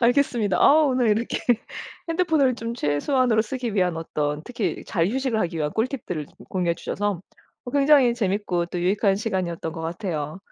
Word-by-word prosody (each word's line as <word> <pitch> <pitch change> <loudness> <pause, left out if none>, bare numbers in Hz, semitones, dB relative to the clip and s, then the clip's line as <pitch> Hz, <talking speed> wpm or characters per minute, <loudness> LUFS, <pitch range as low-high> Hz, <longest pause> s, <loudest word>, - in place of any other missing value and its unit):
알겠습니다. 240 -5 +2
아 310 +2 +6
오늘 255 -4 +2
이렇게 225 +3 0 0.7
핸드폰을 320 -7 +2
좀 230 0 -5
최소한으로 220 - +1
쓰기 240 -1 -4
위한 180 -4 +1
어떤 150 -2 -2
특히 235 -4 -3
잘 170 -1 0
휴식을 255 -1 -1
하기 170 -1 -2
위한 150 -1 0
꿀팁들을 220 - -2
좀 - - -24
공유해 175 -3 0
주셔서 205 0 -2 0.4
어 245 - -6
굉장히 280 -3 +5
재밌고 195 -5 -1
또 175 0 -4
유익한 195 +2 +2
시간이었던 185 -6 -2
것 165 - -7
같아요. 165 -2 -4
210 Hz, 390 characters per minute, -24 LUFS, 170-250 Hz, 0.7 s, 아